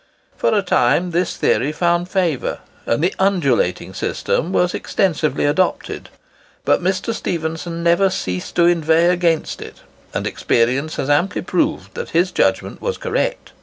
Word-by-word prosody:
For - - +1
a 205 -2 +2
time, 175 +1 +2
this 175 +1 -1
theory 140 +4 +1
found 175 +2 0
favour, 175 -8 0 0.3
and 115 +7 +1
the 180 - +2
"undulating 160 - +1
system" 170 - -1
was 180 -2 +2
extensively 155 -8 0
adopted; 160 +6 -1 0.6
but - - +3
Mr. 190 +5 -1
Stephenson 165 -2 -3
never 170 +3 +4
ceased 90 - -4
to 170 - +4
inveigh 165 0 +3
against 170 -3 0
it; - - -10 0.3
and - - -3
experience 130 +7 0
has 135 - -3
amply 170 +6 +1
proved 180 0 -1
that - - -5
his 180 +2 +2
judgment 95 - 0
was - - -2
correct. - - -2
170 Hz, 145 wpm, -19 LUFS, 150-180 Hz, 0.6 s, never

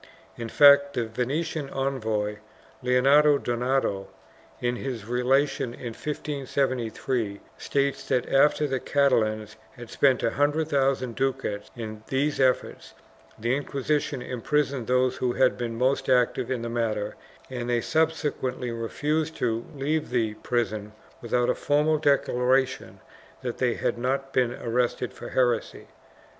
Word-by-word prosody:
In 115 -1 -6
fact, 140 +1 +6
the 120 - 0
Venetian 140 +6 -2
envoy, 110 -7 -2 0.4
Leonardo 140 +4 +5
Donato, 120 -6 -1 0.5
in 120 0 -1
his 120 -6 -5
relation 125 +1 +1
of - - -18
1573, 130 -4 -2 0.2
states 140 0 -1
that, 125 -2 +1
after 150 +2 +3
the 135 -2 -1
Catalans 110 -7 +1 0.2
had 120 -2 -11
spent 135 -3 +3
a 115 - +2
hundred 150 +2 +1
thousand 135 -4 +1
ducats 135 -6 -2
in 110 -2 -6
these 145 +3 0
efforts, 130 -1 0 0.4
the 120 +3 0
Inquisition 140 -1 -2
imprisoned 135 0 -1
those 125 0 +2
who 125 -1 0
had 130 0 +3
been 115 -2 -4
most 135 +2 +1
active 125 -2 +2
in 125 -3 -2
the - - -3
matter 110 -3 -1 0.4
and 120 -1 -4
that - - +1
they 120 - +2
subsequently 150 -6 -1
refused 150 +8 -2
to 115 -1 -1
leave 150 +3 -1
the 115 -3 0
prison 110 -2 -2 0.3
without 120 +1 +1
a - - +3
formal 150 +1 +1
declaration 130 -2 +1 0.4
that 120 -2 -4
they 125 -2 +1
had - - -1
not 135 +2 -1
been 125 -2 +2
arrested 120 -2 -1
for - - -9
heresy. 120 -3 0
125 Hz, 135 wpm, -26 LUFS, 120-140 Hz, 0.5 s, fact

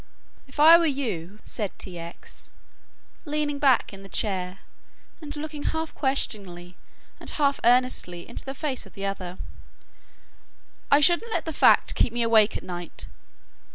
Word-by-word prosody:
"If 270 +2 -12
I 325 +3 +9
were 335 - +2
you," 210 - -3
said 210 -5 -3
T. 180 -2 -6
X., 170 0 -9 0.7
leaning 295 -2 -2
back 265 -7 +3
in 195 - -10
the 195 - -12
chair 185 -2 -1 0.6
and 300 -1 -7
looking 300 0 -6
half 320 +1 -3
questioningly 195 - -2 0.4
and - - -2
half 280 -2 +1
earnestly 240 -8 +2
into 235 - -6
the 270 0 -6
face 270 -7 -4
of - - -18
the 200 -1 -5
other, 185 -2 -4 1.5
"I 285 +1 +5
shouldn't 350 +9 +4
let - - -1
that 320 - -4
fact - - +5
keep - - +1
me 240 0 -1
awake 220 -2 +4
at - - -10
night. 175 -2 -5
240 Hz, 155 wpm, -25 LUFS, 190-290 Hz, 1.5 s, I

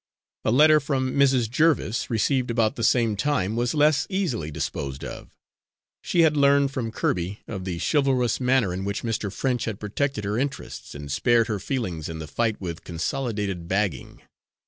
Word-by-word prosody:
A - - +1
letter 155 +6 +6
from 135 -3 -1
Mrs. 135 -4 +3
Jerviss, 130 -3 +1
received 125 +3 +1
about 115 -2 +1
the 115 - -4
same 115 -3 +3
time, 110 -3 0
was 120 +4 0
less 150 -1 +3
easily 165 - -1
disposed 70 -2 -4
of. - - -8 0.7
She 175 - +2
had 155 -2 +4
learned, 140 -1 +4
from 125 -4 -3
Kirby, 95 -1 -2
of 95 -4 -5
the 90 -3 -3
chivalrous 130 - +1
manner 125 -7 +2
in 95 +1 -4
which 100 0 -3
Mr. 110 -3 -2
French 125 +3 -1
had 110 -4 -4
protected 110 +2 -2
her 105 +3 -1
interests 140 - -5
and 70 -1 -7
spared 120 - +3
her 105 -2 -1
feelings 95 - -3
in 80 - -5
the 80 - -6
fight 110 +8 -1
with 85 -3 -6
Consolidated 100 0 -3
Bagging. 95 -5 -2
115 Hz, 170 wpm, -25 LUFS, 95-135 Hz, 0.7 s, letter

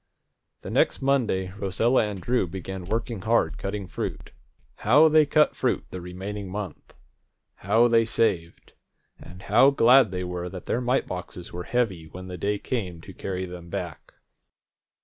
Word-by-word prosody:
The - - -7
next - - +1
Monday 115 -9 +1
Rosella 105 +5 +2
and 100 -2 -5
Drew 120 0 0
began 95 +1 -6
working 115 +1 -3
hard 110 -7 +1
cutting 100 0 -4
fruit. 80 - -5 0.5
How 145 +9 +5
they 155 -1 +5
cut 150 +1 +3
fruit - - 0
the 90 - -6
remaining 95 +3 -6
month! 100 -3 -7 0.6
How 110 +5 +3
they 115 -1 +4
saved! 90 -7 -1 0.5
And 90 +2 -12
how 120 +7 +5
glad 130 -3 +6
they 90 0 -3
were 90 0 -4
that 90 -2 -9
their 120 - -1
mite 125 +2 +1
boxes 90 -1 -7
were 90 0 -5
heavy 100 -10 -1
when 90 +3 -9
the 90 - -6
day 105 +3 0
came 95 -8 -4
to 95 - -11
carry 95 0 -4
them 90 -1 -9
back! - - -6
100 Hz, 160 wpm, -25 LUFS, 90-115 Hz, 0.6 s, glad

